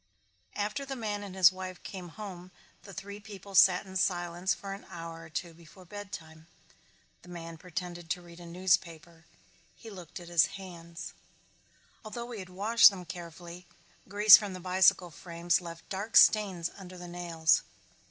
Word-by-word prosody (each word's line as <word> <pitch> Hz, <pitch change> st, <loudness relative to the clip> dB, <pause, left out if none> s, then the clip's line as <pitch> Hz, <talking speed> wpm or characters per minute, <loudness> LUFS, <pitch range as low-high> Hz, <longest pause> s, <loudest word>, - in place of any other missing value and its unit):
After 210 Hz, +7 st, -2 dB
the 275 Hz, 0 st, -5 dB
man 210 Hz, -4 st, -3 dB
and 200 Hz, -2 st, -8 dB
his 185 Hz, -2 st, +7 dB
wife 185 Hz, -1 st, -8 dB
came 185 Hz, -3 st, -7 dB
home 185 Hz, -2 st, -9 dB, 0.3 s
the 200 Hz, -, -12 dB
three 200 Hz, +2 st, -8 dB
people 200 Hz, -2 st, -11 dB
sat 185 Hz, -1 st, +6 dB
in 190 Hz, -1 st, -11 dB
silence 175 Hz, -1 st, 0 dB
for 195 Hz, -1 st, -3 dB
an 195 Hz, -, -11 dB
hour 165 Hz, -1 st, -8 dB
or 165 Hz, -, -12 dB
two 170 Hz, +1 st, -5 dB
before 170 Hz, +3 st, -16 dB
bedtime. 170 Hz, -5 st, -9 dB, 0.7 s
The 180 Hz, -, -16 dB
man 165 Hz, -2 st, -8 dB
pretended 175 Hz, -1 st, -6 dB
to 180 Hz, -, -2 dB
read 170 Hz, 0 st, -14 dB
a 175 Hz, -, -10 dB
newspaper. 170 Hz, -1 st, -1 dB, 0.5 s
He 225 Hz, -, -12 dB
looked 180 Hz, -5 st, -9 dB
at 175 Hz, -, -11 dB
his 170 Hz, -2 st, +4 dB
hands. 170 Hz, -3 st, -9 dB, 0.9 s
Although 235 Hz, +2 st, -7 dB
he 225 Hz, -, -6 dB
had 185 Hz, -1 st, -8 dB
washed 215 Hz, +5 st, +6 dB
them 190 Hz, -3 st, -9 dB
carefully 175 Hz, +1 st, -9 dB, 0.4 s
grease 205 Hz, +1 st, +9 dB
from 205 Hz, -3 st, -5 dB
the 185 Hz, -, -7 dB
bicycle 180 Hz, -1 st, +3 dB
frames 170 Hz, +3 st, -1 dB
left 170 Hz, -1 st, -10 dB
dark 200 Hz, +4 st, 0 dB
stains 190 Hz, -6 st, +5 dB
under 185 Hz, -2 st, -11 dB
the 175 Hz, 0 st, -9 dB
nails. 170 Hz, -2 st, +1 dB
180 Hz, 165 wpm, -30 LUFS, 170-195 Hz, 0.9 s, grease